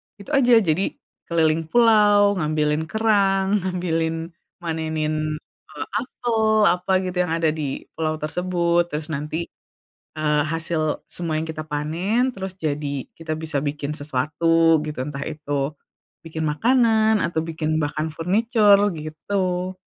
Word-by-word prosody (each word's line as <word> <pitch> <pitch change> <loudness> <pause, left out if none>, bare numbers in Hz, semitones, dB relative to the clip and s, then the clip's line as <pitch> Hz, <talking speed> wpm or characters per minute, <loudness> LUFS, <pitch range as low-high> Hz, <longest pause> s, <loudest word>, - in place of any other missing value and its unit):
itu 205 +7 -11
aja. 265 -4 +4
Jadi 170 +2 0 0.3
keliling 160 -1 +1
pulau 205 -2 +5
ngambilin 155 0 0
kerang, 200 -1 +2
ngambilin 165 -3 -2 0.3
manenin, 160 -2 -2 0.5
eee, 150 -1 -6
apel, 240 -2 -2 0.2
apa 180 -1 +2
gitu, 180 -1 -4
yang 160 - -1
ada 165 -1 +2
di 150 -3 -4
pulau 155 -1 -2
tersebut 175 +1 +1
terus 150 0 -4
nanti, 150 +3 -3 0.8
eee, 150 -1 +2
hasil 160 -1 -2
semua 165 -3 -3
yang 160 - -3
kita 155 -1 -5
panen, 160 +9 -1
terus 190 -1 -5
jadi 145 -4 -3
kita 165 -1 -4
bisa 160 -2 -2
bikin 145 0 -3
sesuatu 155 +3 +2
gitu. 150 -2 -6
Entah 140 -1 -5
itu 145 -2 -2 0.5
bikin 160 0 -4
makanan 220 - +3
atau 170 -1 -2
bikin 155 -1 -1
bahkan 150 +2 -2
furniture 205 +5 +3 0.2
gitu. 180 +4 -2
165 Hz, 125 wpm, -23 LUFS, 155-190 Hz, 0.8 s, pulau